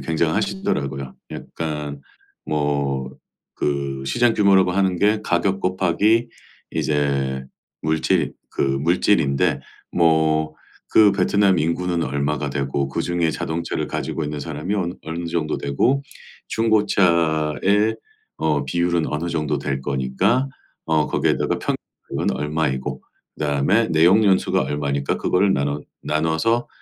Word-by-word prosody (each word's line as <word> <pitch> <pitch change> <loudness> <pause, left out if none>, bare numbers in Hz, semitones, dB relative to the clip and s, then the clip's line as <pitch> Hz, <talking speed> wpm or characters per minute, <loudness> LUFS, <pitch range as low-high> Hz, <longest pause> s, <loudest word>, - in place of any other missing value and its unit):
굉장하시더라고요. 65 -2 -1 0.2
약간 75 -3 -5 0.4
뭐 70 -3 -1 0.4
그 70 -2 -2
"시장 120 - +2
규모라고 95 -3 +4
하는 95 -1 +1
게 105 +1 +3
가격 95 0 0
곱하기 95 +6 +2 0.4
이제 70 -3 0 0.4
물질 80 0 +1 0.2
그 - - -6
물질인데 70 +1 +2 0.3
뭐 80 -2 +2 0.4
그 105 -2 +7
베트남 100 0 +3
인구는 85 +2 0
얼마가 70 +1 -1
되고 70 0 -1
그중에 85 +3 0
자동차를 85 +2 -3
가지고 80 - -3
있는 75 0 -4
사람이 80 +6 -3
어느 90 -3 -1
어느 85 +1 -4
정도 80 -2 -1
되고 120 - +1 0.5
중고차의 100 -2 +2 0.4
어 75 -3 0
비율은 85 +2 +1
어느 85 +3 -3
정도 75 -2 -1
될 70 -1 -2
거니까 70 - 0 0.4
어 80 -2 +2
거기에다가 - - 0
평 - - -1 0.4
은 - - +1
얼마이고 75 -1 -2 0.4
그다음에 75 +10 +1
내용 85 +7 +5
연수가 95 -2 +3
얼마니까 70 -1 -1
그거를 95 +1 +2
나눠 70 +1 -1 0.2
나눠서 80 +10 0
80 Hz, 270 characters per minute, -22 LUFS, 70-95 Hz, 0.5 s, 그